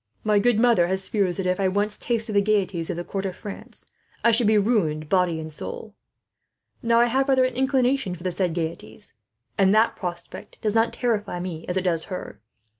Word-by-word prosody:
My 210 -1 +3
good 230 +1 +2
mother 230 -8 +4
has 190 +1 -2
fears 195 -4 0
that, 190 - -2
if 180 +1 0
I 195 - +2
once 205 +2 0
tasted 230 -2 -2
the 200 - +4
gaieties 195 -5 0
of 180 - -3
the 175 - -3
court 195 +2 -3
of 185 - -6
France, 205 - -9 0.4
I 235 - +5
should 230 -1 +3
be 215 0 +4
ruined, 170 -9 +1
body 180 -3 +2
and 155 -1 -7
soul. 210 +7 -7 0.9
"Now 230 0 +3
I 240 - +6
have 265 +3 +1
rather 260 -1 +4
an 255 - -2
inclination 260 -5 +1
for 175 - -12
the 185 - -1
said 175 -2 -1
gaieties, 170 +5 -5 0.5
and 195 +1 +5
that 220 +1 +3
prospect 175 -3 -7
does 210 -2 0
not 225 +1 +3
terrify 210 -7 -1
me 175 -3 -6
as 180 - -2
it 185 - 0
does 170 -3 0
her. 180 - -7
200 Hz, 210 wpm, -24 LUFS, 180-230 Hz, 0.9 s, I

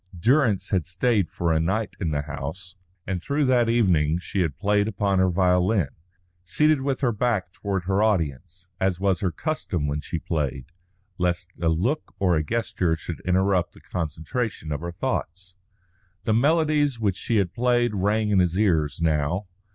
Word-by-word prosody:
Durrance 120 - +2
had 90 -5 +1
stayed 100 +1 +1
for 85 -1 0
a 80 - +2
night 100 +7 -1
in 85 - 0
the 75 -1 -1
house, 80 +6 -7 0.3
and 90 -2 -3
through 140 - 0
that 125 -3 +3
evening 85 -9 +3
she 95 +2 -2
had 80 -5 -1
played 105 +2 +2
upon 100 -2 0
her 95 0 +4
violin, 90 -1 +2 0.5
seated 150 - +2
with 135 0 -1
her 125 -3 +2
back 110 -5 -1
toward 100 -3 -3
her 95 +3 +1
audience, 85 -3 -1
as 95 -2 0
was 95 -2 +1
her 95 - 0
custom 90 - -3
when 75 +1 -2
she 85 - -4
played, 70 -6 -2 0.5
lest 90 0 -1
a 85 - +2
look 110 - -1
or 90 -3 +2
a 80 - +1
gesture 95 -5 0
should 80 0 -6
interrupt 95 0 +2
the - - -16
concentration 80 - -4
of 75 0 -3
her 85 0 -4
thoughts. 90 +1 -4 0.7
The 110 - +1
melodies 145 0 +2
which 100 -4 +1
she 115 - -1
had 95 -4 0
played 120 -1 +2
rang 105 +2 +1
in 100 - +4
his 90 0 +1
ears 80 -7 +1
now. 80 +5 +1
95 Hz, 175 wpm, -24 LUFS, 85-110 Hz, 0.7 s, her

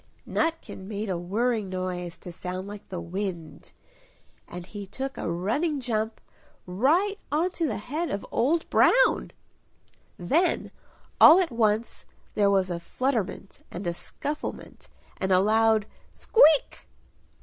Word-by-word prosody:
Nutkin 325 -12 -2
made 210 0 -4
a 180 - -1
whirring 215 +3 -1
noise 180 -2 -4
to 175 - -10
sound 185 +2 -6
like 205 0 -10
the 185 - -5
wind, 175 -2 -6 0.8
and 175 0 -8
he 200 +1 -8
took 265 +7 -5
a - - -3
running 275 - -1
jump 225 -3 -2 0.5
right 320 - +1
onto 335 +2 0
the - - -2
head 295 - -3
of 200 - -4
Old 315 +8 +1
Brown!... - - +4 0.9
Then 310 - +1 0.5
all 330 +4 +9
at 360 -6 0
once 225 -1 0 0.3
there 205 -1 +3
was 190 -2 +2
a 170 - -3
flutterment 210 0 -3
and 180 +3 -7
a 175 - -1
scufflement 290 - -6 0.3
and 190 - -2
a 185 - +6
loud 220 +1 +3 0.3
"Squeak!" 320 - +3
210 Hz, 130 wpm, -26 LUFS, 185-280 Hz, 0.9 s, all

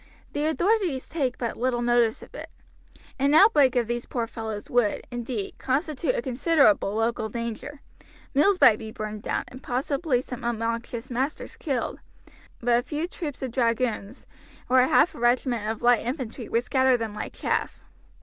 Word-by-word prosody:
The 295 +1 -1
authorities 345 -3 +1
take 270 -6 -2
but 235 -3 -3
little 240 -1 0
notice 240 -2 +2
of - - -15
it. - - -8 0.7
An 280 +2 +3
outbreak 300 - +6
of 245 -1 +2
these 240 +1 -3
poor 235 -2 -2
fellows 220 -2 -6
would, 245 -4 +1
indeed, 240 -4 -4
constitute 285 +1 0
a - - -2
considerable 255 - +3
local 225 0 0
danger. 235 +5 -5 0.5
Mills 360 +7 +4
might 215 - +7
be 220 -1 -7
burned 215 -1 -6
down, - - -2
and 255 - -11
possibly 270 +2 0
some 250 0 -7
obnoxious 230 +1 -3
masters 265 +5 -3
killed, 270 -7 -3 0.6
but 240 0 +3
a - - -1
few 305 +6 -3
troops 300 -7 -6
of 260 - -3
dragoons, 230 -2 -1 0.4
or 255 0 +6
half 265 +6 +4
a - - -11
regiment 240 -2 +1
of 225 +1 -4
light 240 -1 +4
infantry, 245 -2 -5
would 230 +1 +1
scatter 260 0 +3
them 225 -2 -4
like 210 - -6
chaff. - - -2
245 Hz, 165 wpm, -26 LUFS, 230-275 Hz, 0.7 s, might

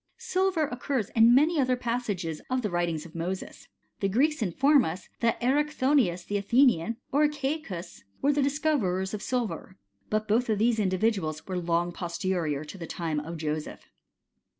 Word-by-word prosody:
Silver 385 -7 0
occurs 250 -4 -2
in 230 +1 +6
many 310 +4 +4
other 255 -1 +2
passages 220 -10 -3
of 255 -1 0
the 210 - -1
writings 170 -3 -1
of 170 - -12
Moses. 180 +2 -5
f - - -27 0.3
The 195 - 0
Greeks 285 +8 +2
inform 270 - +4
us, 175 +3 -5
that 230 -1 +1
Erichthonius 260 -8 +2
the 205 - -1
Athenian, 230 -2 +3
or 295 +2 +4
Ceacus, 270 - -4 0.2
were 290 +1 +2
the 290 - +1
discoverers 270 -11 0
of 210 - -4
silver; 230 -6 -3 0.3
but 215 0 0
both 230 +3 +2
of 215 - +2
these 225 +1 +2
individuals 185 -5 0
were 185 -1 -3
long 175 0 0
posterior 170 -4 -2
to 170 +6 -10
the 165 - -6
time 160 -3 -2
of 165 +3 -6
Joseph. 155 -1 -5
215 Hz, 165 wpm, -28 LUFS, 175-265 Hz, 0.3 s, in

